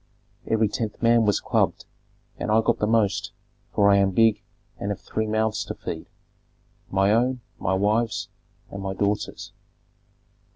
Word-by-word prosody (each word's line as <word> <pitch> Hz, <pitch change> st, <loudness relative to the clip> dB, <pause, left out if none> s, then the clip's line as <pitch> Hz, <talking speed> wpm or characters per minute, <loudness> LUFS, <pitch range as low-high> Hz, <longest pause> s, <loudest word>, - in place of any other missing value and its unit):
Every 110 Hz, -1 st, +2 dB
tenth 105 Hz, 0 st, -4 dB
man 115 Hz, -1 st, +5 dB
was 105 Hz, -, +3 dB
clubbed, -, -, 0 dB, 0.5 s
and -, -, -3 dB
I 110 Hz, +1 st, +4 dB
got -, -, +1 dB
the 105 Hz, -, +1 dB
most, 105 Hz, -2 st, +1 dB, 0.4 s
for 100 Hz, -1 st, +3 dB
I 100 Hz, -, +5 dB
am 100 Hz, -1 st, +3 dB
big 110 Hz, +2 st, +3 dB, 0.4 s
and 100 Hz, -, -3 dB
have 100 Hz, -, -3 dB
three 110 Hz, 0 st, -3 dB
mouths 110 Hz, 0 st, 0 dB
to -, -, -5 dB
feed, -, -, -6 dB, 0.8 s
my 95 Hz, +1 st, +3 dB
own, 125 Hz, +2 st, +1 dB, 0.2 s
my 95 Hz, -, 0 dB
wife's, 110 Hz, +4 st, 0 dB, 0.4 s
and 100 Hz, -, -6 dB
my 95 Hz, 0 st, -3 dB
daughter's. 100 Hz, +1 st, -2 dB
105 Hz, 155 wpm, -24 LUFS, 100-110 Hz, 0.8 s, man